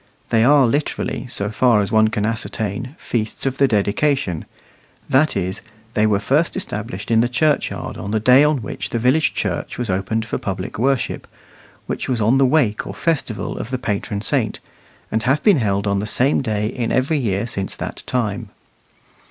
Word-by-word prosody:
They 110 -1 +4
are 140 +1 +6
literally, 140 +1 -1
so 105 -3 -3
far 120 -1 +4
as 100 - -1
one 110 0 +5
can 105 -1 -1
ascertain, 115 - -3
feasts 110 +1 -3
of 135 0 -1
the 140 - +5
dedication 105 - 0 0.6
that 145 0 +3
is, 95 +2 -2 0.3
they 110 0 +3
were 105 -2 +3
first 150 - +1
established 115 - -5
in 115 0 +5
the 120 - +1
churchyard 150 +4 0
on 100 - -6
the 110 +1 +1
day 125 +5 +6
on 150 -5 +2
which 100 0 -5
the - - -2
village 130 +7 +2
church - - -3
was 120 -5 -2
opened 105 +4 -1
for 110 - -3
public 95 +1 -4
worship, 135 +1 0 0.6
which - - -4
was 125 -3 0
on 115 +5 +3
the 135 - +5
wake 125 -7 +1
or - - -6
festival 145 -10 -2
of - - -5
the 130 - -1
patron 105 -3 -3
saint, - - 0 0.5
and 110 - +1
have 130 +6 +1
been 205 -6 +5
held 100 -4 0
on 100 -1 +1
the 105 - -3
same 130 +6 +2
day 105 -4 -1
in 115 +2 -2
every 140 +4 +1
year 100 -4 -1
since 100 -5 -4
that - - -6
time. 110 -3 -1
115 Hz, 185 wpm, -20 LUFS, 105-135 Hz, 0.6 s, are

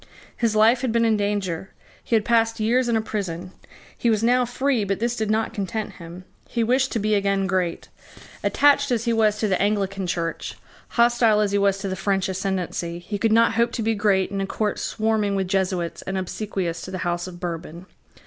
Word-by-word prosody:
His 230 -2 0
life 225 +3 +5
had 255 -3 0
been 230 0 +2
in 225 -1 +3
danger. 200 -4 -2 0.3
He 230 - 0
had 215 - +2
passed 225 -1 +2
years 240 +3 +2
in 230 - +2
a - - +1
prison. 185 -5 -4 0.4
He 235 - 0
was 220 -1 +1
now 250 +1 +3
free: 250 -1 0
but 195 -1 -2
this 235 +1 0
did 220 -2 -2
not 220 +1 0
content 205 +2 -3
him: 170 +1 -10 0.3
he 235 - 0
wished 260 +3 +2
to - - 0
be 215 +1 0
again 200 -1 +1
great. 180 -2 -1 0.6
Attached 285 0 +4
as 235 -2 0
he 235 - +2
was 215 -2 +2
to 215 - 0
the 190 -2 +1
Anglican 195 -2 0
Church, 170 -1 -3 0.3
hostile 235 -2 +3
as 210 -2 +1
he 200 - +2
was 200 -1 +2
to 195 0 -4
the 190 - -2
French 195 0 0
ascendency, 185 -3 -3
he 200 +4 -5
could 225 +1 +2
not 230 +1 +4
hope 235 +1 +2
to 230 - -2
be 225 +1 +1
great 200 -3 +1
in 195 -1 -2
a 195 - -2
court 210 +1 -2
swarming 215 -2 0
with 190 -1 -1
Jesuits 185 -3 -1
and 190 0 -4
obsequious 185 -2 -3
to - - -7
the 185 - -4
House 175 +1 -1
of 175 -1 -9
Bourbon. 170 0 -6
205 Hz, 215 wpm, -23 LUFS, 190-225 Hz, 0.6 s, life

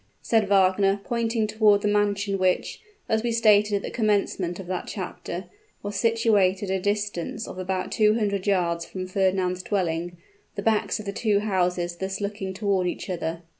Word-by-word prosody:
said 220 -3 +2
Wagner, 195 0 +3
pointing 230 -1 0
toward 210 -1 +3
the - - +2
mansion 205 -1 +1
which, 185 -1 0 0.3
as 220 0 +1
we 235 0 -1
stated 210 -2 +4
at 200 - -1
the - - -5
commencement 200 -5 0
of 190 - -7
that 180 0 -4
chapter, 185 -2 -5 0.4
was 205 0 -4
situated 205 -4 +2
at 190 - +1
a - - -6
distance 205 0 -2
of 185 - -8
about 185 0 -2
two 215 -1 +3
hundred 200 -3 -1
yards 170 -4 +1
from 185 +1 -6
Fernand's 185 -1 0
dwelling, 175 -3 -2 0.4
the 200 - -4
backs 220 -1 +1
of 215 - -8
the 200 - -4
two 205 -1 +1
houses 180 -4 0
thus 190 +1 -3
looking 200 -1 -4
toward 190 -2 0
each 180 - -4
other. 165 -1 -4
200 Hz, 175 wpm, -25 LUFS, 185-210 Hz, 0.4 s, stated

